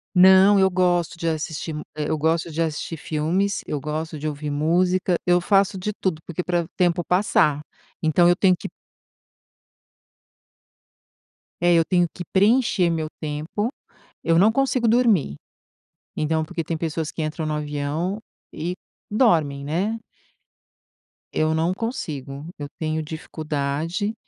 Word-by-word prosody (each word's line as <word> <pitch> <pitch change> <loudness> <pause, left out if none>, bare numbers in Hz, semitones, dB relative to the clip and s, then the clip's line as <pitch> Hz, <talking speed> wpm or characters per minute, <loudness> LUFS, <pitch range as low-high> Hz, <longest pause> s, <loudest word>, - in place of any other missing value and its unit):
Não, 190 +2 +7
eu 190 0 +5
gosto 180 -1 +1
de 165 - -2
assistir 160 0 -3
mu 150 - -5
eu 155 +1 -1
gosto 160 +2 0
de 160 +2 -2
assistir 160 +1 -4
filmes, 170 +7 -1
eu 150 - -2
gosto 155 +2 -4
de 155 - -4
ouvir 150 0 -4
música, 180 +5 +1
eu 175 -1 +4
faço 195 +2 +2
de 190 +3 -2
tudo 185 -6 -2
porque 175 +1 -4
pra 175 -1 +1
o 160 - -11
tempo 175 -1 +2
passar, 165 -5 +2 0.4
então 165 +2 +4
eu 175 - +5
tenho 185 -1 +4
que - - -6 2.9
é 175 0 +4
eu 165 -1 +5
tenho 175 -2 +2
que 175 - -6
preencher 200 -3 +3
meu 160 -2 -1
tempo, 155 +9 -2 0.5
eu 165 0 +3
não 210 +5 +5
consigo 260 -2 +1
dormir. 220 - +3 0.8
Então, 160 +1 0
porque 165 +1 -4
tem 160 +1 -3
pessoas 160 -1 -3
que 160 - -4
entram 155 +1 -3
no 155 - -1
avião 150 +6 -2 0.3
e 170 +4 -3 0.4
dormem, 160 - +2
né. 190 +10 -1 1.4
Eu 155 0 +1
não 165 +3 +1
consigo, 150 - -5
eu 145 -1 -5
tenho 155 +2 -3
dificuldade. 155 +5 -3
165 Hz, 140 wpm, -23 LUFS, 155-185 Hz, 2.9 s, Não